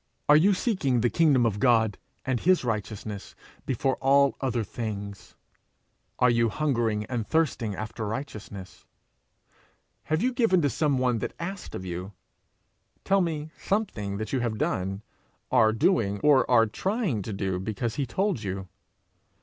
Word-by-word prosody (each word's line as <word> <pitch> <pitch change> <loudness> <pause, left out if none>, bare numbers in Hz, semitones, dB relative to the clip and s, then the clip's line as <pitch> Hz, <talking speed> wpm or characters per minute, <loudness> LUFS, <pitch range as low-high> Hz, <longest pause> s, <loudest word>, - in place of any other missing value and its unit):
Are 150 - +7
you 190 +6 +5
seeking 150 - 0
the 120 - +2
kingdom 145 -7 +4
of 105 -3 0
God 110 -4 +3 0.3
and 130 -2 0
his 185 +2 +3
righteousness 105 -3 -4 0.3
before 130 +1 0
all 140 +1 +4
other 125 -4 0
things? 100 -2 -6 0.8
Are 125 -1 +4
you 115 -1 +2
hungering 115 -6 0
and 115 -2 -3
thirsting 135 -10 0
after 110 +1 -5
righteousness? 105 -6 -7 1.2
Have 155 +4 0
you 255 +1 +1
given 225 -7 +3
to 145 - +2
some 145 +2 +1
one 125 -2 +1
that - - -4
asked 185 +2 -6
of 95 - -6
you? 90 +3 -5 0.9
Tell 195 0 +3
me 155 -3 -3
something 110 - -2
that 110 +3 -5
you 130 - +2
have 120 -3 -2
done, 95 +1 -2 0.5
are 110 - +5
doing, 115 - +1
or 145 -3 +4
are 115 -3 +6
trying 185 - -1
to 105 - -6
do 95 -2 -2
because 110 +4 -3
he 140 -3 -1
told 190 - -1
you. 95 -1 -4
120 Hz, 150 wpm, -27 LUFS, 105-150 Hz, 1.2 s, Are